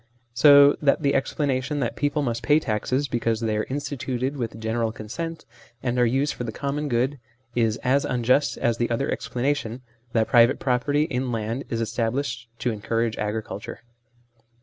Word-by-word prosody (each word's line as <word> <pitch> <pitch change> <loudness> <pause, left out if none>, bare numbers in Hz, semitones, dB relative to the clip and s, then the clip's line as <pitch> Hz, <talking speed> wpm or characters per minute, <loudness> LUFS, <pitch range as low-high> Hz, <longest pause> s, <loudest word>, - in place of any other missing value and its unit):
So 140 +2 +7
that 145 +1 +2
the 140 - +3
explanation 135 0 0
that 115 - -1
people 145 +1 0
must 120 -2 -2
pay 150 +1 +4
taxes 130 +3 -1
because 115 -2 0
they 110 -2 -1
are 105 - -1
instituted 135 -1 -3
with 115 -4 -4
general 110 0 -1
consent 165 +11 -6 0.4
and 125 -1 0
are 120 - +4
used 135 +5 +1
for - - -5
the 115 - -4
common 145 +4 -3
good, 130 +3 0 0.3
is 115 -2 +1
as 135 +2 +3
unjust 125 +3 +1
as 120 -1 0
the 120 - +1
other 120 +4 -1
explanation, 125 -2 -2 0.3
that 110 -1 +2
private 120 +1 +5
property 140 +3 +1
in 130 -5 -2
land 115 +3 -3
is 115 -1 -2
established 115 +2 -2
to 125 - +1
encourage 115 +1 -1
agriculture. 105 +1 -4
125 Hz, 165 wpm, -24 LUFS, 115-140 Hz, 0.4 s, So